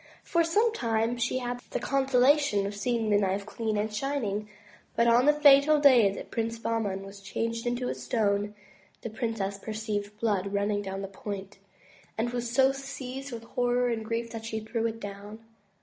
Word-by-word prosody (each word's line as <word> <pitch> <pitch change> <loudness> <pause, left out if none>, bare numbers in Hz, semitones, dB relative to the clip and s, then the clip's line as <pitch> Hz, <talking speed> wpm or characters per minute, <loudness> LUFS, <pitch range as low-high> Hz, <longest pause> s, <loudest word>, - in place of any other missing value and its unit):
For 340 -1 +2
some 430 +8 +2
time 230 - 0
she 240 +2 0
had 245 -1 -3
the - - -2
consolation 270 -4 +3
of 200 +1 -4
seeing 225 +1 0
the 205 - +5
knife 195 0 0
clean 215 0 -2
and 210 +1 -1
shining. 215 -4 -2 0.5
But 235 - +3
on 235 +3 +5
the - - +9
fatal 295 0 +6
day 250 -8 +6
that - - -8
Prince 230 0 -2
Bah 230 0 -1
man 195 -3 -3
was 195 0 -11
changed 230 +4 -3
into 245 +1 -1
a - - -1
stone, 205 -2 -1 0.5
the 230 - -5
princess 220 -4 -3
perceived 210 -1 -4
blood 200 -3 0
run 200 +1 +1
ning 205 -1 0
down 195 0 -5
the - - -4
point, 195 0 -7 0.6
and 235 +2 0
was 240 -1 -3
so 265 +2 +4
seized 270 0 -7
with 230 -1 -6
horror 245 +1 +1
and 225 -2 -2
grief 230 +1 -3
that 225 -1 -6
she 220 -1 -3
threw 225 +1 -2
it 225 0 -5
down. 205 +1 -8
230 Hz, 190 wpm, -28 LUFS, 205-250 Hz, 0.6 s, the